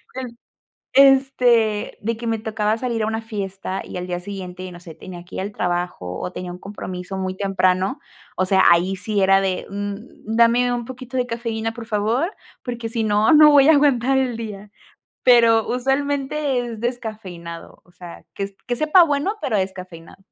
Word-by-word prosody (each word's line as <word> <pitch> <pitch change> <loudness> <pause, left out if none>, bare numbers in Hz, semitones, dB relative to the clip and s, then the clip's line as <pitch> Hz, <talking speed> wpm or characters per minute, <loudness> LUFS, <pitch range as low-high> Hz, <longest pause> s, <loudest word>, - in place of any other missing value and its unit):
Em, 250 -2 -6 0.6
este 250 -6 +4
de 230 +2 -1
que 235 - -7
me 225 -1 0
tocaba 215 0 -1
salir 235 -2 -2
a 215 - 0
una 225 0 -2
fiesta 195 -3 -5
y - - -7
al 180 0 -5
día 175 0 -3
siguiente, 185 -1 -7
no 175 - -11
sé, 165 -3 -11
tenía 175 -2 -10
que - - -12
ir - - -2
al 200 +2 -4
trabajo, 175 - -3
o 180 - -4
tenía 180 -1 -6
un 180 - -8
compromiso 190 -2 -7
muy 185 0 -3
temprano, 195 +4 +1 0.4
o 185 - +2
sea, 190 0 +3
ahí 180 +3 +3
sí 205 0 -1
era 195 0 +5
de, 190 -2 -2
mm, 205 0 -4 0.4
dame 235 +1 +4
un 240 -1 -3
poquito 260 0 -7
de 250 - +1
cafeína, 230 -1 -3
por 230 -1 -8
favor, 230 - 0 0.3
porque 240 -2 -4
si 225 0 -2
no, 215 +5 +3
no 300 0 +8
voy 280 -1 +6
a - - +8
aguantar 270 -2 +3
el 255 -3 0
día, 210 -2 -7 0.5
pero 230 -3 +5
usualmente 275 +1 0
es 235 -2 -5
descafeinado, 205 -9 -6
o 175 - -24
sea, 175 -1 -11
que 200 0 -5
que 245 - 0
sepa 310 +7 +5
bueno, 305 +7 0
pero 215 -4 0
descafeinado. 185 -3 -6
220 Hz, 185 wpm, -21 LUFS, 190-245 Hz, 0.6 s, no